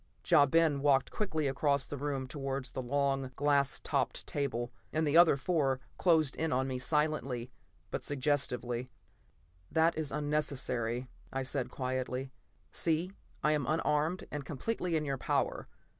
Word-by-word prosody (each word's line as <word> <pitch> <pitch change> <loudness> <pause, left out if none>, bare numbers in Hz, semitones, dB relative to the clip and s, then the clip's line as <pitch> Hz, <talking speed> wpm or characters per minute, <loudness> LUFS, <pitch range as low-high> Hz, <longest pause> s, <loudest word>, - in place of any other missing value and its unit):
Ja 145 - +6
Ben 155 -1 +3
walked 140 -2 +3
quickly 160 -8 -1
across 140 0 +1
the - - -6
room 140 -1 -2
towards 135 -1 -4
a - - -2
long, 135 0 0
glass 140 -1 +2
topped - - -1
table; 125 -4 -2 0.2
the 155 -1 +1
other 170 -4 +7
four 135 -3 +1 0.2
closed 160 -5 +3
in 160 0 0
on 130 +1 +1
me 130 -1 -3
silently 135 -4 0 0.4
but - - -3
suggestively. 130 -3 0 0.8
"That 165 +1 +3
is 155 -2 -3
unnecessary," 135 -5 -1 0.2
I 135 0 -2
said 130 -1 -1
quietly. 130 0 -3 0.4
"See, 165 +2 0 0.3
I 150 - +4
am 150 -4 0
unarmed 155 +2 +1
and 150 -1 -4
completely 170 - -2
in 155 -1 0
your 135 -2 -2
power. - - -1
140 Hz, 145 wpm, -32 LUFS, 130-155 Hz, 0.8 s, other